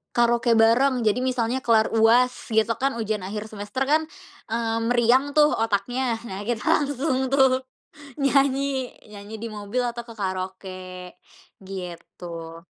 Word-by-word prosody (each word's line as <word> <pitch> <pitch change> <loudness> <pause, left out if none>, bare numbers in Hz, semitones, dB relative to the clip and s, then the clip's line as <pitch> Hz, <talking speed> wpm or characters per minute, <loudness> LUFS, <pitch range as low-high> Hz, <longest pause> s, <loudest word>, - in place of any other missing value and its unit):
karaoke 235 0 +3
bareng 240 +3 +4
jadi 215 +3 +2
misalnya 255 -1 0
kelar 225 -3 +3
UAS 235 +3 +3
gitu 220 0 +2
kan, 270 -1 0
ujian 215 -2 -2
akhir 210 +1 -4
semester 210 +5 -3
kan, 315 +1 +5 0.5
eee, 225 0 -1
meriang 245 +4 +3
tuh 300 0 +6
otaknya 225 +3 0
nah 195 -4 -6
kita 235 -3 -2 0.2
langsung 275 -2 -1
tuh 265 -1 +3 0.6
nyanyi 275 -1 +1 0.2
nyanyi 210 +1 -10
di 230 - -5
mobil 210 +2 -4
atau 235 0 -5
ke 230 -1 -12
karaoke, 185 -1 -5 0.5
gitu. 170 -3 -8
230 Hz, 130 wpm, -24 LUFS, 205-255 Hz, 0.6 s, tuh